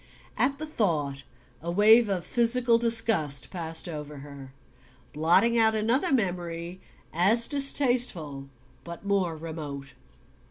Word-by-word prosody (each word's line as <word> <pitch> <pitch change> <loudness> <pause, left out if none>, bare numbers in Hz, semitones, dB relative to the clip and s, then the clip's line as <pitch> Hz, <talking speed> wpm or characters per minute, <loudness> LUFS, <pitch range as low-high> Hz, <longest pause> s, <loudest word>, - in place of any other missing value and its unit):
At 275 +2 +1
the 310 - -6
thought 155 - -2 0.4
a 170 - -6
wave 215 +5 +4
of 185 -3 -3
physical 240 0 +1
disgust 225 - 0
passed 165 -3 -4
over 150 -3 -8
her, 140 -2 -12 0.6
blotting 175 +10 +2
out 220 -1 +2
another 230 +7 0
memory 175 -5 -3 0.3
as 210 +8 +4
distasteful 245 - +1 0.3
but 170 +3 -10
more 195 -5 -1
remote. 150 -4 -8
180 Hz, 115 wpm, -26 LUFS, 160-230 Hz, 0.6 s, wave